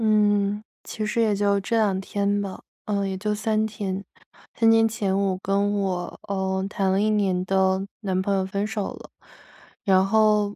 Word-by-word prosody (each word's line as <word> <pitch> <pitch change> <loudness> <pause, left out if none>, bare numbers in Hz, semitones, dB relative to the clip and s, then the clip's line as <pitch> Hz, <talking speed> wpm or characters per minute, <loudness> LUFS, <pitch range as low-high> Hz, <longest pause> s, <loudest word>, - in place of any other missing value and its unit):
嗯， 205 -1 +2 0.2
其 215 - -4
实 220 +2 0
也 215 -2 +2
就 200 0 +2
这 230 +4 -1
两 200 -4 +2
天 200 +1 -1
吧， 195 -2 -5 0.3
嗯， 200 -2 -1
也 190 - -3
就 210 +2 -1
3 215 +1 0
天 200 -2 -4 0.5
3 225 -1 +4
天 225 0 +5
前 205 -3 -1
我 195 -1 +1
跟 200 +1 +1
我， 185 -3 -3
呃， 190 -1 -1
谈 195 -1 0
了 190 - +2
1 215 +1 +2
年 190 -4 +1
的， 190 0 +2
男 190 -4 -1
朋 200 +1 0
友 190 -1 +1
分 200 +2 -2
手 210 -2 -3
了。 - - -13 0.7
然 190 -1 +5
后， 210 0 +3
200 Hz, 175 characters per minute, -24 LUFS, 190-210 Hz, 0.7 s, 天